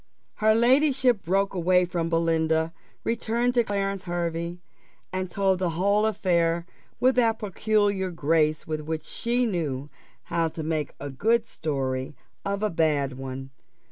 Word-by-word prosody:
Her 215 0 +4
ladyship 255 -1 +4
broke 195 +3 +1
away 180 0 +3
from 170 -1 -2
Belinda, 165 -1 +1 0.3
returned 235 +1 0
to 240 -1 +4
Clarence 195 -2 -2
Hervey, 170 -1 -2 0.6
and 185 -1 -2
told 190 0 +1
the 180 -2 +1
whole 200 +3 +3
affair 170 -5 +1 0.3
with 255 +1 +4
that 225 -2 +3
peculiar 205 -2 +1
grace 155 -2 +1
with 155 -1 -3
which 155 0 -4
she 245 +1 0
knew 150 - -2 0.3
how 170 -1 0
to 160 0 -6
make 155 -2 -2
a 140 0 -5
good 225 - +2
story 135 - -3 0.3
of 200 +1 -2
a 215 - +1
bad 150 -5 +1
one. 135 0 -6
175 Hz, 140 wpm, -26 LUFS, 160-210 Hz, 0.6 s, Her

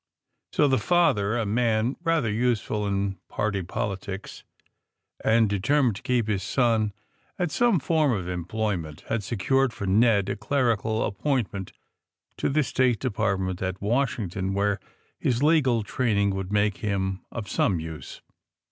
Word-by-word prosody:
So 150 - +3
the 130 -1 +2
father, 120 - +2
a 115 - 0
man 115 +3 +1
rather 165 -10 +1
useful 110 -2 0
in 100 -1 -1
party 100 -2 -1
politics, 95 +2 -5 0.8
and 110 0 +4
determined 115 +4 +2
to - - -10
keep 120 -3 0
his 100 -3 0
son 115 -1 +1 0.5
at 175 -5 -1
some 235 -3 +3
form 155 0 +2
of 95 -6 -2
employment, 90 -3 -3
had 110 -1 0
secured 120 +6 +1
for 100 - -5
Ned 100 0 +3
a - - -1
clerical 115 -3 0
appointment 100 -4 -2 0.7
in - - +1
the 150 +1 +3
State 125 -2 +2
Department 95 -6 -1
at 95 0 -2
Washington, 100 -5 -1
where 100 0 +1 0.4
his 125 +2 0
legal 135 -8 +3
training 105 -3 +1
would 95 0 -4
make 105 -1 +2
him 95 -2 -2
of 110 -3 -5
some 90 -4 +1
use. 80 -4 -8
110 Hz, 140 wpm, -26 LUFS, 95-125 Hz, 0.8 s, and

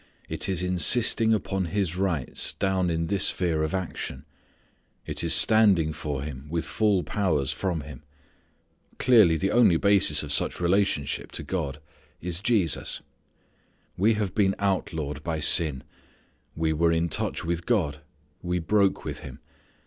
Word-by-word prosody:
It - - -1
is 90 -2 -1
insisting 110 +5 +3
upon 95 -3 -1
His 90 -1 -2
rights 90 -8 -1
down 95 -2 0
in 85 0 -1
this 100 +2 0
sphere 85 -4 0
of 80 +4 -1
action. 80 -6 -5 0.8
It - - -3
is - - +1
standing 100 -8 +4
for 70 -3 -4
Him 70 -1 -8
with 85 +1 -2
full 105 -4 +1
powers 80 -10 -1
from 90 -5 -3
Him. 70 -3 -11 1.0
Clearly 110 -10 +5
the 95 +6 -1
only 115 -8 +4
basis 100 -6 +3
of 75 - -6
such - - 0
relationship 90 -5 0
to - - -5
God 75 -6 -4 0.4
is 85 -1 -3
Jesus. 100 - 0 0.9
We 110 +4 +2
have 105 -4 -2
been 100 -2 +1
outlawed 80 -7 -2
by 80 -1 -3
sin. 75 -3 +2 0.7
We 80 -1 0
were 85 +2 +2
in 85 +1 +1
touch 80 - -2
with 85 0 -3
God. 80 - 0 0.4
We 90 0 -2
broke 100 +3 +1
with - - -5
Him. - - -10
90 Hz, 150 wpm, -25 LUFS, 80-100 Hz, 1.0 s, Clearly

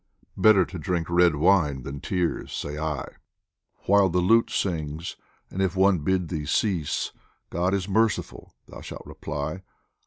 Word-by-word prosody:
Better 105 -4 +5
to 90 0 -8
drink 85 -1 -1
red 85 -2 +4
wine 75 -5 +2
than 70 +2 -6
tears, 90 -3 -2
say 75 - -4
I, 75 -2 -2 0.8
While 100 -1 +5
the 90 - -1
lute 110 +6 +4
sings; 80 -3 -3 0.4
and 95 - -3
if 95 -1 0
one 95 -1 +4
bid 90 +2 0
thee 75 -4 -4
cease, 85 -3 0 0.2
" - - -43
God 90 +3 +1
is 95 -2 -2
the 100 - -7
merciful! 110 +2 0
" - - -47
thou - - -11
shalt - - -9
reply. 75 +4 -5
90 Hz, 165 wpm, -25 LUFS, 80-95 Hz, 0.8 s, Better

